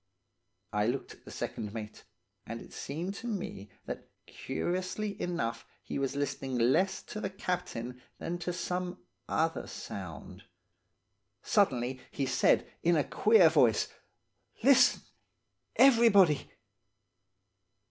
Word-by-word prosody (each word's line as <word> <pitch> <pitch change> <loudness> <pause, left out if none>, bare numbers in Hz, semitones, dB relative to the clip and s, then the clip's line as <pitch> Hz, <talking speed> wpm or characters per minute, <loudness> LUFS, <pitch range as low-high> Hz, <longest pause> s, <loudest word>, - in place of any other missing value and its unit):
"I 105 +1 +2
looked 130 +3 -2
at - - -21
the - - -10
second 105 +1 -5
mate, 110 -1 -7 0.4
and - - -5
it - - -13
seemed 165 +7 -4
to 240 - -6
me 190 - -4 0.2
that, - - -7 0.2
curiously 185 +8 -3
enough 115 -10 -2 0.2
he - - -4
was 135 0 -1
listening 135 -2 -2
less 130 +11 +2
to 215 - -7
the 195 - -2
captain 125 - -4 0.2
than 175 +1 -4
to 180 - -2
some 180 0 -3 0.3
other - - 0
sound. - - -8 1.0
Suddenly 130 - +1
he 140 - -2
said, 130 -1 +3
in 170 +1 +3
a 150 - +3
queer 210 0 +5
voice, 120 -7 +4 0.7
'Listen, 270 +1 +6 0.7
everybody! 225 - +6
170 Hz, 115 wpm, -31 LUFS, 125-195 Hz, 1.0 s, Listen